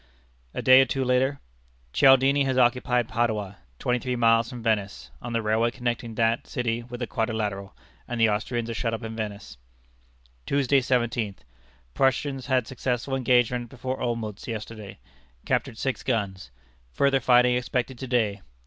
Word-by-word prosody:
A - - -3
day 130 0 +8
or - - +4
two 130 +1 -2
later: 130 +2 +1 0.5
"Cialdini 135 +1 +5
has 130 -1 0
occupied 125 -1 +2
Padua, 110 -5 -1 0.2
twenty 125 - 0
three 125 +1 -2
miles 115 -1 +3
from 120 -2 -8
Venice, 105 -3 -1
on 120 - -6
the 115 -1 0
railway 110 +2 +2
connecting 120 -2 -3
that 115 +1 +1
city 120 -1 -2
with 120 +1 -9
the - - 0
Quadrilateral, 110 -5 -3 0.3
and 120 -1 -4
the 115 - +5
Austrians 115 +2 -1
are 115 - -3
shut 115 0 -1
up 115 - -8
in 110 0 -6
Venice." 105 - -6 0.9
"Tuesday, 140 0 +3
17th. 120 -5 -1 0.5
Prussians 135 - 0
had 130 -3 +2
successful 130 +1 -2
engagement 125 -2 +2
before 130 +1 -5
Olmütz 115 -2 -3
yesterday; 110 -2 -7 0.5
captured 110 - -1
six 130 +1 -2
guns. 100 - -2 0.4
Further 140 -1 +3
fighting 125 0 +4
expected 125 0 -2
to 130 - -5
day. 110 -5 0
120 Hz, 155 wpm, -26 LUFS, 110-130 Hz, 0.9 s, day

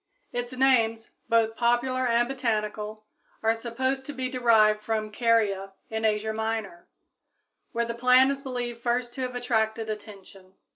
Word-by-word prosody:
Its 245 0 -3
names, 230 -4 +2 0.2
both 225 -1 +3
popular 245 +2 +1
and 240 0 +3
botanical, 215 -4 -3 0.4
are 225 0 +4
supposed 260 +4 -2
to 290 - -7
be 260 -1 -3
derived 220 -4 +4
from 215 0 -2
Caria, 210 -4 +1 0.2
in 220 0 -1
Asia 215 0 +1
Minor, 220 -5 -3 0.8
where 235 0 0
the 235 - -3
plant 250 +3 +5
is 275 0 -4
believed 245 -3 -4
first 240 0 -1
to 265 - -6
have 250 -1 -3
attracted 225 -2 0
attention. 195 -3 -11
230 Hz, 145 wpm, -27 LUFS, 220-250 Hz, 0.8 s, plant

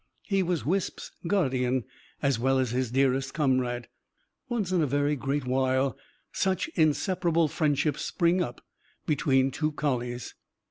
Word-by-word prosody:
He 195 -2 +1
was 175 -3 -1
Wisp's 190 +5 -2 0.2
guardian, 130 - +1 0.4
as 135 -4 +2
well 135 +2 +2
as 130 -3 +1
his 125 -1 0
dearest 135 +1 +1
comrade. 130 -5 +1 0.6
Once 215 -7 -1
in 180 -2 +2
a 150 - +2
very 145 +2 +1
great 135 +1 -2
while 130 +1 +1 0.4
such 190 -2 0
inseparable 170 +1 +2
friendships 150 -1 0
spring 175 +1 +2
up 120 -8 -5 0.4
between 135 -3 +2
two 155 +3 -1
collies. 125 -5 -2
140 Hz, 135 wpm, -28 LUFS, 130-165 Hz, 0.6 s, as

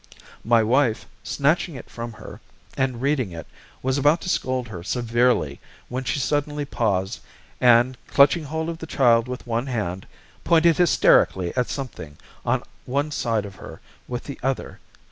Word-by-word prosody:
My 115 -1 +4
wife, 120 0 +2 0.2
snatching 150 - 0
it 130 - -9
from 115 0 -7
her, 105 - -11 0.3
and 130 -2 -1
reading 135 -8 +1
it, 80 -1 -8 0.4
was 130 +2 +1
about 150 +4 +4
to - - -4
scold 130 -6 -1
her 90 -5 -7
severely, 120 - +1 0.3
when 130 +1 -4
she - - 0
suddenly 145 +1 -1
paused, 100 -8 -1 0.4
and 120 +1 +5
clutching 145 +3 +4
hold 160 +2 -3
of 165 -1 -5
the 160 - -7
child 120 -5 +3
with 125 0 -6
one 120 +2 -2
hand, 95 -7 -3 0.4
pointed 165 -1 +4
hysterically 95 - +3
at 125 -1 0
something 80 - -6 0.3
on - - 0 0.2
one 140 +4 -1
side 115 -7 -1
of 100 -1 -10
her - - -10 0.3
with 120 -1 -4
the 140 - -8
other. 135 +1 -3
125 Hz, 160 wpm, -23 LUFS, 115-145 Hz, 0.4 s, and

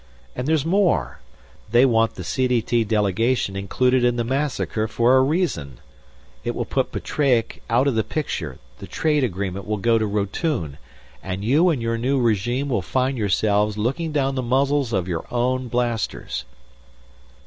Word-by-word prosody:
And 125 +2 -3
there's 155 -2 +2
more. 165 - +1 0.5
They 120 +4 +5
want 115 -2 +2
the 95 - -6
CDT 120 +1 0
delegation 105 +1 +1
included 125 +6 +1
in 120 0 +3
the 120 - 0
massacre 130 -4 -1
for 120 +3 +3
a 130 - +6
reason. 135 - -1 0.7
It - - -2
will - - -2
put - - -1
Petreac 130 -6 0
out 120 +4 +3
of 140 - +2
the 110 -1 +1
picture; 85 - -4 0.2
the - - -9
trade 150 -3 +1
agreement 95 -3 -3
will 105 0 -1
go 115 +2 +2
to 110 - 0
Rotune; 100 - -2 0.4
and 95 +2 -5
you 155 +10 +4
and 140 -8 -1
your 115 0 -1
new 135 +3 +1
regime 120 +4 0
will 115 -7 0
find 130 +8 0
yourselves 105 -1 +1
looking 135 +10 -1
down 135 -2 0
the 130 - -1
muzzles 135 +1 +1
of 95 -4 -1
your 85 -3 -3
own 125 +1 0
blasters." 115 - -2
120 Hz, 160 wpm, -22 LUFS, 105-135 Hz, 0.7 s, a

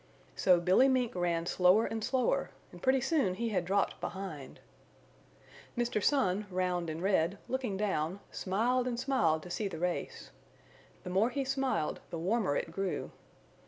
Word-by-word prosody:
So 180 -2 +4
Billy 185 +9 +5
Mink 255 -3 +1
ran 175 -2 0
slower 180 +5 +4
and 225 -1 -3
slower, 255 +1 +1 0.2
and - - -13
pretty 260 0 +3
soon 270 - +1
he 235 +4 -2
had 185 -5 0
dropped 195 +2 0
behind. 185 -8 -6 1.2
Mr. 240 -3 0
Sun, 205 -7 +2
round 180 -2 -1
and 160 +2 -5
red, 190 -1 +2
looking 255 -7 -2
down, 190 -3 -1
smiled 240 +6 0
and 240 -1 -2
smiled 220 - +1
to 180 - -9
see 210 +3 -1
the 185 - -6
race. 175 +1 -3 0.7
The 180 - -6
more 200 +6 +3
he 275 +1 -2
smiled 265 - -1
the 170 - -5
warmer 185 -2 0
it 165 - -2
grew. 195 +2 -3
195 Hz, 160 wpm, -32 LUFS, 180-240 Hz, 1.2 s, Billy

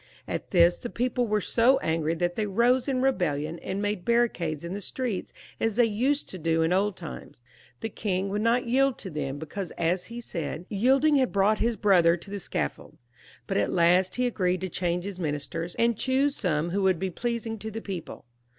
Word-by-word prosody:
At - - -4
this 175 -1 +4
the 240 - -5
people 245 0 0
were 210 0 +1
so 245 +7 +4
angry 160 - 0
that 175 +1 -1
they 215 -1 -1
rose 240 +5 +3
up - - +1
in - - 0
a - - 0
rebellion, 165 - 0
and 190 - -4
made 205 -3 -1
barricades 175 -10 0
in 170 - -4
the 205 - -4
street 235 -2 -3 0.3
as 225 -2 0
they 240 0 +5
used 255 +7 0
to 185 - -7
do 165 0 +1
in 165 +2 +2
old 195 +1 +1
times. 165 -7 -9 0.4
The 225 - -2
king 195 -2 -2
would 205 +2 -1
not 235 +3 +2
yield 265 +2 +2
to 190 - -6
them, 140 -2 -3
because, 160 +5 -5
as 175 +2 0
he 235 +1 -7
said, 170 -6 -5
"yielding 265 +8 +3
had 260 -2 +2
brought 205 +2 +3
his 235 0 +1
brother 175 -5 +4
to 195 +4 -12
the 205 - -3
scaffold," - - -4 0.5
but - - -1
at 100 - +1
last 180 +2 +3
he 250 - +1
agreed 185 -6 0
to 185 - -3
change 175 0 -1
his 195 -1 -6
ministers, 160 +2 -3
and 235 0 +2
choose 270 +5 +1
some 170 -4 -1
who 200 +2 0
would 190 -2 +3
be 190 +2 -2
pleasing 230 +1 -3
to 220 +2 -5
the 220 +1 -5
people. 185 - -7
195 Hz, 215 wpm, -27 LUFS, 170-235 Hz, 0.5 s, they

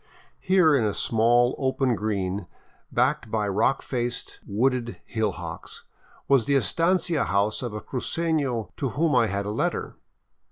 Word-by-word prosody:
Here, 185 -5 +4
in 130 - +2
a 105 -2 0
small 120 +2 +3
open 130 -1 +1
green 100 -2 -2 0.4
backed 125 0 +1
by 105 -1 0
rock 100 +7 +1
faced, 120 -1 -3
wooded 120 +3 0
hillocks, 90 -7 -4 0.4
was 135 -5 +4
the 140 - +3
estancia 165 +2 +2
house 100 +3 0
of 120 -3 -4
a 105 - -5
crucefio 140 -4 -2
to 135 - -1
whom 155 +6 +1
I 120 -3 +4
had 100 0 -2
a 105 - -2
letter. - - -2
120 Hz, 145 wpm, -25 LUFS, 105-140 Hz, 0.4 s, Here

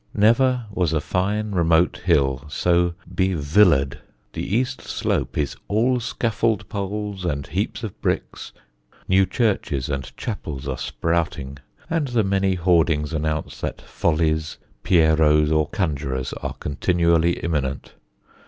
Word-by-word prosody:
Never 120 +3 +3
was 90 -5 0
a 80 - +2
fine 105 +6 -1
remote 85 -2 +3
hill 65 -1 +2
so 85 +3 +1 0.2
be 95 -1 +1
villa'd. 75 -3 +3 0.3
The - - -4
east 125 +6 -1
slope - - -2
is 75 -2 -1
all 120 +5 +2
scaffold 115 -2 -1
poles 100 -1 -4
and 70 -5 -2
heaps - - -3
of - - -7
bricks, - - -2 0.6
new 95 0 +4
churches 85 - 0
and 70 -3 -3
chapels 75 - -5
are 65 -2 -3
sprouting, 80 -5 -2 0.3
and 160 -3 0
the 120 -3 +1
many 95 -1 +1
hoardings 80 -3 +2
announce 80 0 -2
that - - -3
Follies, 80 -1 -1 0.2
Pierrots, 80 -3 +4
or 75 -1 +2
conjurors 70 -8 -2
are - - -3
continually 85 +2 +1
imminent. 75 -6 -3
85 Hz, 125 wpm, -22 LUFS, 75-100 Hz, 0.6 s, new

